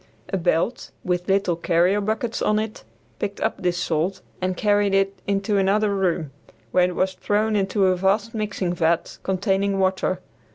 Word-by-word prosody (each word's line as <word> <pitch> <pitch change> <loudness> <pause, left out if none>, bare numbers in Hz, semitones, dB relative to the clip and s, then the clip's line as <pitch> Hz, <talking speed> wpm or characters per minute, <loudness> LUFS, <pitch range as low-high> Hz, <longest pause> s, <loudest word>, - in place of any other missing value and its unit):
A 195 - 0
belt 175 +7 0
with 180 -1 -1
little 195 -2 +2
carrier 175 +4 +2
buckets 220 +3 -2
on 210 - +2
it 215 0 -3 0.4
picked 200 - -3
up 220 - -1
this 180 -1 0
salt 175 +2 -1 0.2
and 185 0 -1
carried 205 -2 +2
it 195 0 +2
into 200 +1 +1
another 200 +2 +2
room, 175 -6 0 0.4
where 180 -1 +4
it 180 - -6
was 185 0 +1
thrown 210 +3 0
into 195 0 +2
a 185 -1 +3
vast 200 +4 +1
mixing 205 -5 -2
vat 170 -1 0
containing 195 +1 0
water. 185 -1 +1
195 Hz, 165 wpm, -23 LUFS, 180-205 Hz, 0.4 s, where